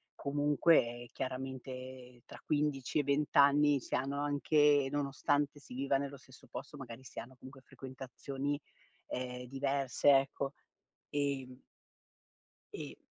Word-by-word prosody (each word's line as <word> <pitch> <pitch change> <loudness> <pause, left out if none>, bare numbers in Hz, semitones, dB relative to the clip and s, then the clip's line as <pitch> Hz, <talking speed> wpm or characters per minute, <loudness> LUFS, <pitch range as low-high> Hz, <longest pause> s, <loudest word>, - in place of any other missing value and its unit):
comunque 140 -4 +2
chiaramente 130 -1 -6
tra - - -11
15 150 -2 +1
e - - +2
20 145 +2 0
anni 145 0 +6
si - - -3
hanno 140 +2 -1
anche 145 -1 +4
nonostante 145 0 0
si 135 - -12
viva 135 +1 +1
nello 140 0 -4
stesso 130 0 -17
posto, 135 +4 -8
magari 130 -1 -9
si - - -8
hanno 130 +2 -9
comunque 130 +1 -12
frequentazioni, 135 +2 -5 0.5
ehm, 125 0 -4
diverse, 135 +1 +1
ecco, 135 0 +2 0.6
ehm 135 -3 -2 1.1
e - - -7
135 Hz, 120 wpm, -34 LUFS, 130-145 Hz, 1.1 s, anni